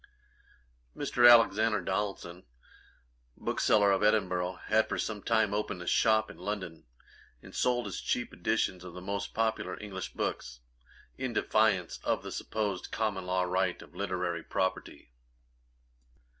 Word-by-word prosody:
Mr. 120 0 +5
Alexander 115 -2 +5
Donaldson, 95 -3 -3 0.9
bookseller 100 -2 +3
of 95 - +2
Edinburgh, 95 -4 +2
had 110 +1 +2
for - - -2
some 105 -2 -3
time 110 -2 +2
opened 105 -3 -2
a 90 - -7
shop 110 +1 +3
in - - -15
London, 95 -7 -5 0.6
and - - -13
sold 120 -1 +1
his - - -5
cheap 120 - -2
editions 100 -5 -1
of 90 -1 -10
the - - -6
most 100 +1 -4
popular 110 -5 -1
English 95 -3 -6
books, - - -4 0.6
in 130 -2 -2
defiance 110 -6 +1
of - - 0
the - - -7
supposed 105 -4 -3
common 100 -4 -2
law 90 0 +1
right 90 0 0
of - - -18
Literary 90 -2 -2
Property. 95 -8 -3
100 Hz, 135 wpm, -30 LUFS, 90-110 Hz, 0.9 s, Mr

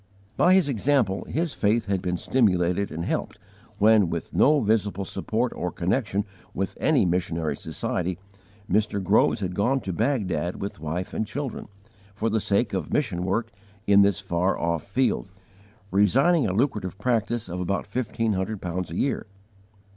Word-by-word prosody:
By 185 +1 +5
his 190 -5 +4
example 120 -7 +1
his 165 0 -2
faith 110 +3 +1
had 100 -2 -1
been 90 -2 -1
stimulated 95 -4 +1
and 85 +2 -4
helped - - -2 0.4
when, 105 -3 +5
with 85 -1 -4
no 150 +1 +5
visible 105 -4 0
support 115 +5 -1
or 90 - -3
connection 100 +2 -1 0.3
with 95 +1 -2
any 145 -10 +3
missionary 85 -4 -1
society, 90 +4 -3 0.5
Mr. 105 -1 +1
Groves 100 +2 +3
had 90 -2 -2
gone 120 +9 +1
to 95 - -4
Baghdad 90 - -1
with 100 -4 -5
wife 80 +4 -4
and 110 - -2
children, 140 -1 -5 0.5
for 110 +2 -1
the 110 0 +1
sake 100 +2 +1
of 90 -6 -3
mission 100 -12 0
work 110 +5 -1 0.3
in 100 0 +6
this 100 0 +3
far 95 -1 0
off 85 -1 -1
field, - - 0 0.6
resigning 130 - +4
a - - 0
lucrative 105 -5 -1
practice 115 0 0
of 90 0 -5
about 95 +2 -1
fifteen 115 0 -1
hundred 95 +2 -2
pounds 90 0 -4
a 85 - -6
year. 130 +1 -1
100 Hz, 160 wpm, -25 LUFS, 90-115 Hz, 0.6 s, in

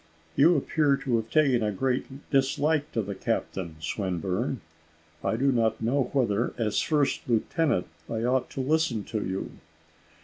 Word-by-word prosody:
"You 165 +4 +6
appear 145 0 +2
to 125 -5 0
have 115 0 -3
taken 140 -6 +3
a 105 -1 +1
great 130 +5 -2
dislike 145 +2 +2
to 115 - 0
the 100 +1 -4
captain, 95 -3 -3
Swinburne. 95 - -2 0.6
I - - +1
do 135 +4 +2
not 115 -3 +1
know 125 +4 +1
whether, 120 -4 +1
as 110 -3 +1
first 150 -3 +1
lieutenant, 120 - +1 0.2
I 115 0 -2
ought 125 +1 +1
to 135 - -4
listen 135 -6 +1
to 110 0 -3
you." 95 +1 -3
125 Hz, 150 wpm, -27 LUFS, 105-140 Hz, 0.6 s, You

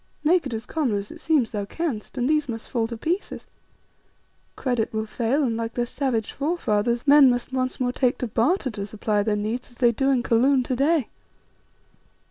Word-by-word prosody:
Make 325 -1 +3
it 255 - -6
as 220 - -6
common 285 -9 -1
as 200 +1 -6
it - - -12
seems 295 -8 +2
thou 205 -2 -3
canst, 265 -2 -4
and 250 0 +1
these 300 -2 +1
must 225 -1 -5
fall 230 -3 0
to 230 0 -6
pieces. 345 - -3 1.1
Credit 245 -4 -1
will 220 0 -2
fail 240 +6 0
and, 235 -4 0
like 230 0 -4
their 240 - 0
savage 240 -4 -2
forefathers, 240 -7 -1
men 285 -1 +7
must 245 +1 -1
once 255 0 -1
more 250 -1 +1
take 250 0 +1
to 250 - -3
barter 260 - +1
to 200 -2 -5
supply 210 0 -1
their 210 0 0
needs 215 +4 -3
as 240 - -20
they 240 -1 +3
do 270 +4 0
in 255 -3 +2
Kaloon 255 +3 +3
to 255 - -2
day." 280 0 +2
245 Hz, 200 wpm, -24 LUFS, 225-275 Hz, 1.1 s, men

